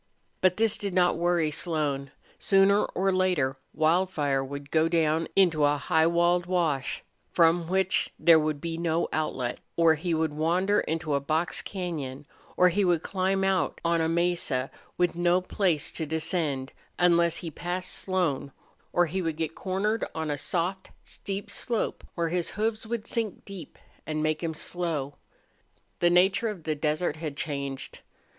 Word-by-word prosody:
But 185 -1 +3
this 225 -1 +3
did 200 -3 -3
not 180 -1 +4
worry 170 -2 +1
Slone. 145 -4 -1 0.3
Sooner 195 +1 +4
or 195 +1 0
later 180 -8 +1
Wildfire 155 -4 +1
would 140 +1 -8
go 160 0 +3
down 160 -1 +1
into 170 -6 +4
a 145 0 +3
high 160 +1 +2
walled 175 +1 +2
wash, 160 -7 0 0.3
from 165 0 +3
which 190 +1 +1
there 165 -2 +6
would 155 -1 -1
be 165 +1 -4
no 170 0 0
outlet; 130 -6 -2 0.2
or 165 -1 +5
he 165 +2 -1
would 160 -1 0
wander 180 +7 +2
into 160 -1 -2
a 140 - +2
box 155 +5 0
cañon; 150 -8 -5 0.3
or 180 0 +6
he 200 +4 +1
would 175 -3 +2
climb 190 0 0
out 190 -1 +1
on 170 0 +2
a 160 - +1
mesa 170 -6 0 0.3
with 175 -1 +2
no 175 +1 +3
place 180 -4 0
to 160 - -4
descend, 155 -4 -2 0.2
unless 170 -1 +3
he 165 - -6
passed 180 +4 -3
Slone; 175 -8 -1 0.4
or 175 - +3
he 185 +4 -2
would 165 -3 -2
get 160 0 -2
cornered 205 +5 -1
on 160 -2 -2
a - - 0
soft, 180 +5 -2
steep 200 0 -5
slope 235 -3 -2
where 170 -1 0
his 175 0 -1
hoofs 220 +1 -1
would 230 -1 -3
sink 230 -4 -2
deep 195 -6 -10 0.3
and 155 0 -2
make 155 0 0
him 165 -2 -3
slow. 155 -5 -3 0.8
The 175 - +4
nature 190 +6 +3
of 205 -7 -5
the 155 - -1
desert 155 +2 -1
had 155 -3 -5
changed. 140 -3 -4
170 Hz, 165 wpm, -27 LUFS, 155-185 Hz, 0.8 s, there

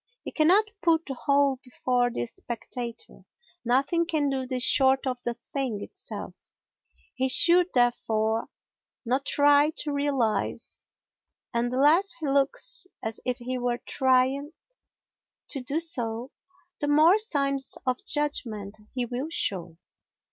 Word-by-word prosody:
He - - -6
cannot 385 +7 +3
put 330 -1 +2
the 270 - -5
whole 280 +1 +2
before 250 -1 0
the 120 - -3
spectator, 235 - -7 0.4
nothing 275 +8 +1
can 300 -4 0
do 265 -1 -3
this 255 -1 0
short 265 0 +4
of 255 -2 -2
the 240 0 -2 0.2
thing 260 -7 -2
itself; - - -7 0.8
he 260 0 0
should, 345 +6 +6
therefore, 225 -2 +1 0.6
not 260 +4 -1
try 290 +1 +5
to 295 -1 -2
realise, 245 -7 -1 0.7
and 235 +1 0
the 255 - -2
less 320 +8 +4
he 320 -3 -6
looks 280 - +1 0.2
as 220 0 -4
if 250 -1 -1
he 250 +1 -4
were 245 -1 -1
trying 265 +4 +1 1.0
to 275 - -4
do 275 +5 -1
so 245 -7 -1 0.5
the 290 - -2
more 315 +7 +5
signs 275 - -1
of 255 -1 -1
judgment 220 -9 -3 0.2
he 250 -2 -1
will 250 +6 -4
show. 175 - -2
265 Hz, 135 wpm, -26 LUFS, 245-290 Hz, 1.0 s, should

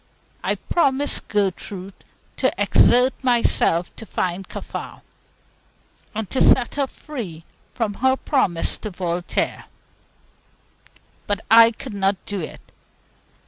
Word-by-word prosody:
I - - +1
promised 285 -4 0
Gertrude 195 -1 -2 0.4
to - - +2
exert 250 +2 +5
myself 230 -8 +2
to 225 - -10
find 180 +1 -2
Kaffar, - - -7 1.2
to 260 - -1
set 245 -2 +5
her 280 -1 0
free 205 - -8 0.3
from 225 -4 -1
her 260 +5 +2
promise 190 - 0
to 215 - -5
Voltaire; 175 -2 -2 1.6
but 205 0 0
I 230 0 +9
could 230 +1 -8
not 195 0 +1
do 205 -1 -4
it. 155 - -9
210 Hz, 105 wpm, -22 LUFS, 185-255 Hz, 1.6 s, I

